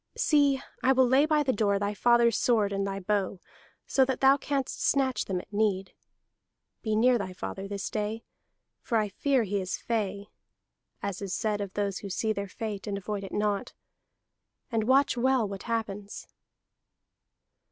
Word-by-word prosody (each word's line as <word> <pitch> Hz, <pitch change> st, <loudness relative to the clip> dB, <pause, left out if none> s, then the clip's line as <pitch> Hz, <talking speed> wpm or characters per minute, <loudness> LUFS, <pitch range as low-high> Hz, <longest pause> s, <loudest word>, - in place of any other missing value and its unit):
See, 285 Hz, -3 st, +3 dB, 0.2 s
I 265 Hz, -, +4 dB
will 260 Hz, -1 st, +4 dB
lay 270 Hz, +4 st, +4 dB
by 305 Hz, -1 st, +3 dB
the 265 Hz, -2 st, +1 dB
door 200 Hz, -1 st, +2 dB
thy 205 Hz, +1 st, -1 dB
father's 235 Hz, +1 st, +4 dB
sword 215 Hz, -5 st, +2 dB
and 195 Hz, 0 st, -1 dB
thy 195 Hz, 0 st, -3 dB
bow, 195 Hz, -1 st, -1 dB, 0.5 s
so 270 Hz, -, +3 dB
that 260 Hz, -1 st, -2 dB
thou 270 Hz, 0 st, +6 dB
canst 280 Hz, -1 st, -3 dB
snatch 265 Hz, -2 st, +1 dB
them 185 Hz, -2 st, -2 dB
at 195 Hz, -, -13 dB
need. 200 Hz, -2 st, 0 dB, 0.9 s
Be 220 Hz, -1 st, -1 dB
near 245 Hz, +2 st, +4 dB
thy 190 Hz, -2 st, -4 dB
father 195 Hz, +1 st, -6 dB
this 200 Hz, -1 st, -4 dB
day, 215 Hz, +1 st, -3 dB, 0.6 s
for 230 Hz, -, 0 dB
I 210 Hz, -1 st, +1 dB
fear 265 Hz, +5 st, +1 dB
he 200 Hz, -1 st, -1 dB
is 185 Hz, -1 st, -3 dB
'fey' 205 Hz, -3 st, -2 dB, 0.8 s
[as 200 Hz, -1 st, -3 dB
is 195 Hz, -2 st, -3 dB
said 210 Hz, -2 st, -1 dB
of 200 Hz, -2 st, -5 dB
those 200 Hz, -2 st, -1 dB
who 200 Hz, -, -7 dB
see 215 Hz, +3 st, 0 dB
their 200 Hz, -1 st, -4 dB
fate 210 Hz, 0 st, -5 dB
and 200 Hz, -1 st, -2 dB
avoid 200 Hz, +1 st, -4 dB
it 195 Hz, -, -7 dB
not], 205 Hz, -1 st, -1 dB, 1.0 s
and 225 Hz, -2 st, 0 dB
watch 265 Hz, +1 st, +3 dB
well 255 Hz, -2 st, +2 dB
what 195 Hz, -1 st, -6 dB
happens." 210 Hz, -3 st, -3 dB
210 Hz, 175 wpm, -28 LUFS, 200-250 Hz, 1.0 s, thou